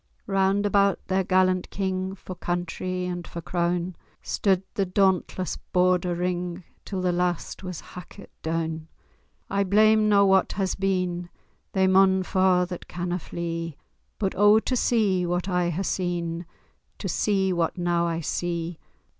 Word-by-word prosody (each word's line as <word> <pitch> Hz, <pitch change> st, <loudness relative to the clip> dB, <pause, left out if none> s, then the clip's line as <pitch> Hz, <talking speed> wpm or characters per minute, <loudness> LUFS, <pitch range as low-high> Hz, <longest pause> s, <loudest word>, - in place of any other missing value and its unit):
Round 195 Hz, 0 st, +2 dB
about 200 Hz, -1 st, +3 dB
their 190 Hz, 0 st, +2 dB
gallant 185 Hz, 0 st, +2 dB
king, 190 Hz, -1 st, -2 dB
For 185 Hz, -, -8 dB
country 180 Hz, +1 st, -3 dB
and 175 Hz, -1 st, -4 dB
for 170 Hz, -, -7 dB
croun, 175 Hz, +1 st, -1 dB, 0.3 s
Stude 195 Hz, -2 st, +1 dB
the 200 Hz, -, +1 dB
dauntless 185 Hz, -1 st, +1 dB
Border 180 Hz, -1 st, +1 dB
ring, 180 Hz, 0 st, -2 dB, 0.2 s
Till 190 Hz, -2 st, -3 dB
the 180 Hz, -1 st, +1 dB
last 175 Hz, -1 st, -1 dB
was 185 Hz, -3 st, -6 dB
hackit 180 Hz, -2 st, -11 dB
doun. 160 Hz, -1 st, -2 dB, 0.6 s
I 200 Hz, 0 st, +1 dB
blame 215 Hz, +2 st, +4 dB
na 200 Hz, -1 st, +5 dB
what 190 Hz, -1 st, +3 dB
has 190 Hz, -2 st, -1 dB
been— 180 Hz, -2 st, -1 dB, 0.4 s
They 190 Hz, -1 st, +3 dB
maun 190 Hz, 0 st, +4 dB
fa' 185 Hz, -1 st, +3 dB
that 180 Hz, -1 st, -7 dB
canna 175 Hz, +1 st, -3 dB
flee— 165 Hz, -2 st, -5 dB, 0.4 s
But 195 Hz, -3 st, -1 dB
oh, 205 Hz, +2 st, +6 dB
to 255 Hz, -, -1 dB
see 210 Hz, -7 st, +2 dB
what 175 Hz, +2 st, -1 dB
I 180 Hz, -2 st, +1 dB
hae 175 Hz, +3 st, -2 dB
seen, 175 Hz, -2 st, -2 dB, 0.5 s
To -, -, -4 dB
see 195 Hz, -3 st, +1 dB
what 170 Hz, 0 st, 0 dB
now 175 Hz, -1 st, +1 dB
I 165 Hz, 0 st, -2 dB
see! 170 Hz, +1 st, -3 dB
180 Hz, 145 wpm, -25 LUFS, 175-190 Hz, 0.6 s, oh